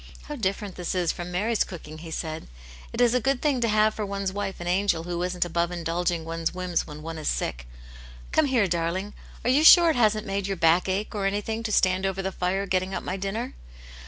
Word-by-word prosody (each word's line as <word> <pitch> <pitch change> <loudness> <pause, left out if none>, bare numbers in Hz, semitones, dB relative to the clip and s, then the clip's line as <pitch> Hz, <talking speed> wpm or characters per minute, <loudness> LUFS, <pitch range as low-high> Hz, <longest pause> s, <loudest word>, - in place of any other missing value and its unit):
"How 295 - -6
different 200 -4 -2
this 180 0 -3
is 175 -2 +1
from 175 0 -6
Mary's 215 +5 +1
cooking," 155 -3 -9
he 165 0 -9
said. 160 0 -4 0.2
" - - -17
It - - -5
is 245 -1 +4
a 250 - +3
good 270 +1 +1
thing 280 -4 +1
to 235 - +2
have 215 0 +3
for 215 - -4
one's 200 -1 -3
wife 200 -1 -4
an 175 - -6
angel 180 -2 +1
who 175 0 -3
isn't 180 0 0
above 170 0 0
indulging 170 0 -1
one's 165 +1 -2
whims 180 -2 -1
when 150 +1 -9
one 165 0 -5
is 155 - -5
sick. - - -2 0.6
Come 315 - +3
here, 255 -6 +3
darling! 180 +3 -1 0.3
Are 245 - +2
you 285 +4 +4
sure 340 0 +9
it - - -2
hasn't 215 -3 +2
made 195 0 -2
your 195 -1 -2
back 170 +3 +3
ache, 195 +3 -1
or 200 -2 0
anything, 210 +3 -2
to 225 -1 -3
stand 185 -1 +3
over 195 0 -3
the 190 - -2
fire 185 +2 -1
getting 185 0 -1
up - - -4
my 185 - -3
dinner 200 +6 -3
190 Hz, 235 wpm, -26 LUFS, 175-215 Hz, 0.6 s, sure